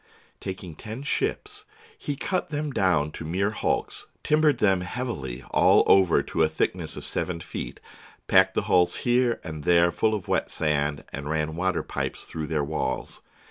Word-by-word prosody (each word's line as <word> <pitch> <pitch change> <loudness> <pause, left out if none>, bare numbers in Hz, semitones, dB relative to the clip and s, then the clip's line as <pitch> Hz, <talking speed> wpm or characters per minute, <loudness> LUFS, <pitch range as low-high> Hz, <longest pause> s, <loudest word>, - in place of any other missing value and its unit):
Taking 95 -3 -6
ten 110 - -8
ships, 420 - -2 0.3
he 145 - -4
cut 185 +6 -2
them 150 -1 -2
down 80 -8 +2
to - - -7
mere 95 +6 0
hulks, 110 - -2 0.2
timbered 150 -3 +3
them 95 -5 +3
heavily 75 - -4
all - - +5
over 95 -3 +5
to - - -2
a 80 - +4
thickness 80 - -2
of - - -6
seven 90 -2 -2
feet, - - -6 0.5
packed - - +5
the - - +1
hulls 90 -1 +3
here 120 -1 +2
and 80 -3 -6
there 85 +1 +4
full 110 +3 +1
of 100 - -6
wet - - 0
sand, 75 -1 0
and 70 +1 -5
ran 80 0 -1
water 90 0 0
pipes - - -4
through 80 -1 -5
their 75 -2 0
walls. 70 -3 -3
90 Hz, 170 wpm, -26 LUFS, 80-120 Hz, 0.5 s, all